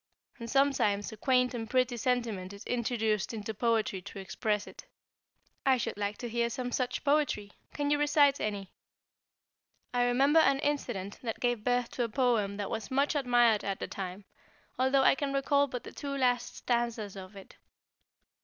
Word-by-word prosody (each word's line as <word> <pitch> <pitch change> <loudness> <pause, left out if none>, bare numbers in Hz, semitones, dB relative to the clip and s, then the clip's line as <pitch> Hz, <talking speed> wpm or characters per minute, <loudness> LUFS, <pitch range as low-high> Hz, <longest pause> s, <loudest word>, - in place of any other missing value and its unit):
And 230 0 -6
sometimes 265 -7 +2
a - - -8
quaint 250 +2 +2
and 225 -2 -5
pretty 255 -1 +2
sentiment 230 -6 -1
is 200 +2 -10
introduced 225 -3 -1
into 220 0 -4
poetry 220 -3 0
to 200 - -10
express 210 +2 -2
it." - - -13 0.8
"I 265 -1 +4
should 235 - -3
like 205 0 -3
to 240 - -5
hear 235 0 0
some 245 +1 -4
such 255 0 -2
poetry. 285 -8 +1 0.2
Can 290 0 -1
you 295 - +3
recite 290 -1 +4
any?" 200 -3 -3 1.2
"I 245 0 +2
remember 275 +6 +4
an 275 -3 +4
incident 245 -10 -2
that 225 -3 -4
gave 245 -3 0
birth 245 0 +1
to 245 - -1
a 230 - -2
poem 220 -5 +1
that 205 -1 -4
was 215 -3 -4
much 275 +3 +1
admired 240 -6 +3
at 195 -1 -3
the - - -4
time, 190 +1 -6 0.5
although 265 +1 +3
I - - +6
can 275 0 -2
recall 280 +1 +2
but 250 -2 -6
the - - -9
two 280 -1 -5
last 245 -2 +1
stanzas 235 -4 -1
of 190 +1 -10
it. 195 - -13
240 Hz, 175 wpm, -30 LUFS, 210-265 Hz, 1.2 s, I